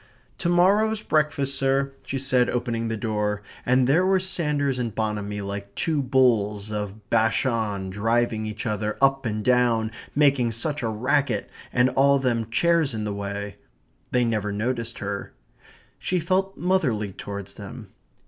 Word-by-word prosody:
"To 175 Hz, -, 0 dB
morrow's 205 Hz, +5 st, +3 dB
breakfast, 145 Hz, -3 st, +1 dB
sir," 135 Hz, 0 st, +1 dB
she 135 Hz, -, -3 dB
said, 130 Hz, -2 st, +2 dB
opening 120 Hz, -2 st, -1 dB
the 115 Hz, 0 st, -2 dB
door; 105 Hz, -2 st, -1 dB, 0.2 s
and 125 Hz, +1 st, +4 dB
there 150 Hz, +8 st, +4 dB
were 190 Hz, 0 st, +3 dB
Sanders 150 Hz, -8 st, 0 dB
and 115 Hz, -4 st, -3 dB
Bonamy 105 Hz, -2 st, -2 dB
like 100 Hz, 0 st, -6 dB
two 155 Hz, -3 st, 0 dB
bulls 110 Hz, -6 st, +2 dB
of 105 Hz, 0 st, -5 dB
Bashan 110 Hz, -4 st, +1 dB
driving 110 Hz, +2 st, 0 dB
each 110 Hz, +1 st, -5 dB
other 105 Hz, -1 st, -2 dB
up 135 Hz, -2 st, +3 dB
and 105 Hz, -1 st, -3 dB
down, 120 Hz, -3 st, +3 dB, 0.2 s
making 135 Hz, -5 st, +3 dB
such 145 Hz, +6 st, -2 dB
a 115 Hz, -, -1 dB
racket, 125 Hz, 0 st, 0 dB, 0.2 s
and 125 Hz, +1 st, +4 dB
all 140 Hz, +1 st, +4 dB
them 120 Hz, -4 st, 0 dB
chairs 165 Hz, 0 st, +2 dB
in 110 Hz, -, -3 dB
the 105 Hz, -1 st, -2 dB
way. 100 Hz, 0 st, -5 dB, 0.5 s
They 125 Hz, -1 st, +2 dB
never 105 Hz, -3 st, -1 dB
noticed 115 Hz, +2 st, -2 dB
her. 100 Hz, 0 st, -5 dB, 0.7 s
She 180 Hz, -, 0 dB
felt 190 Hz, +3 st, 0 dB
motherly 135 Hz, -, +1 dB
towards 100 Hz, 0 st, -7 dB
them. 105 Hz, +1 st, -9 dB
120 Hz, 150 wpm, -25 LUFS, 105-140 Hz, 0.7 s, and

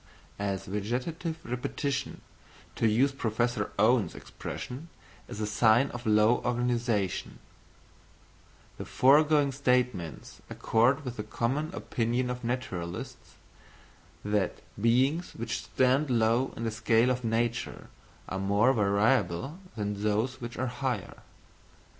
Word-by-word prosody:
As 100 Hz, -2 st, -2 dB
"vegetative 125 Hz, -, -3 dB
repetition," 130 Hz, +2 st, -3 dB, 0.5 s
to 115 Hz, -, +2 dB
use 125 Hz, +6 st, +3 dB
Professor 120 Hz, -1 st, -1 dB
Owen's 110 Hz, +1 st, +3 dB
expression, 140 Hz, +7 st, -7 dB, 0.4 s
is -, -, -7 dB
a 105 Hz, -, 0 dB
sign 110 Hz, +5 st, +3 dB
of 120 Hz, -1 st, -6 dB
low 105 Hz, +3 st, +4 dB
organisation; 120 Hz, -5 st, -1 dB, 1.4 s
the -, -, -5 dB
foregoing 145 Hz, +1 st, +4 dB
statements 125 Hz, -, -1 dB
accord 125 Hz, +6 st, +2 dB
with 125 Hz, -1 st, -5 dB
the 105 Hz, -, -3 dB
common 130 Hz, +9 st, -2 dB
opinion 125 Hz, -6 st, -1 dB
of 125 Hz, 0 st, -6 dB
naturalists, 95 Hz, -9 st, -5 dB, 0.9 s
that 105 Hz, -3 st, -1 dB, 0.2 s
beings 130 Hz, +9 st, +2 dB
which 115 Hz, +1 st, -3 dB
stand 130 Hz, +3 st, +2 dB
low 115 Hz, +2 st, +2 dB
in 115 Hz, -, -4 dB
the 115 Hz, -, -1 dB
scale 115 Hz, +2 st, +3 dB
of 125 Hz, 0 st, -2 dB
nature 115 Hz, +1 st, -1 dB, 0.4 s
are 95 Hz, -, -3 dB
more 100 Hz, +6 st, +3 dB
variable 110 Hz, -, +1 dB, 0.2 s
than 105 Hz, -2 st, -3 dB
those 110 Hz, +5 st, 0 dB
which 120 Hz, 0 st, -6 dB
are 130 Hz, -, -1 dB
higher. 125 Hz, -4 st, -3 dB
120 Hz, 115 wpm, -29 LUFS, 110-130 Hz, 1.4 s, low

